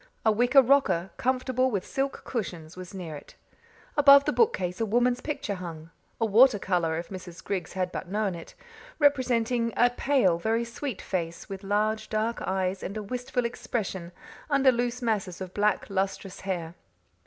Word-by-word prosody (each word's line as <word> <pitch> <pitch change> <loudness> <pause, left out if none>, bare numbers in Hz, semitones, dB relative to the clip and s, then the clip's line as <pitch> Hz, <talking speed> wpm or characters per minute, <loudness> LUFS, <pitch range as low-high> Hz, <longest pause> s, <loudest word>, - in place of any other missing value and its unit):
A 220 - +6
wicker 245 +5 +5
rocker, 245 -9 +2
comfortable 255 0 +1
with 200 -6 -2
silk 270 0 -3
cushions, 175 -9 -5
was 185 -1 -9
near 175 -5 -6
it. 145 - -12 0.6
Above 280 -1 +8
the - - +1
bookcase 185 - +1
a - - +2
woman's 245 +3 +2
picture 290 -8 -3
hung 165 -4 -8 0.3
a 225 - +2
water 225 +2 +6
colour, 175 -4 0
if 170 - -5
Mrs. 180 -3 -9
Griggs 185 -4 -3
had 185 -1 -2
but - - -5
known 205 -1 0
it 170 -1 -10 0.4
representing 245 -5 +2
a 245 0 +5
pale, 245 -10 +2
very 225 +5 0
sweet 235 0 -5
face, 170 -3 -4
with 195 -1 -6
large, 210 +2 0
dark 220 +2 -1
eyes 190 0 -1
and 200 +3 -5
a 215 - -4
wistful 250 +3 -2
expression 195 -7 -4 0.4
under 275 -2 +5
loose 245 +1 -2
masses 210 -6 -1
of 185 -1 -7
black, 210 0 +1
lustrous 195 -1 -3
hair. 175 -4 -4
210 Hz, 165 wpm, -27 LUFS, 185-245 Hz, 0.6 s, Above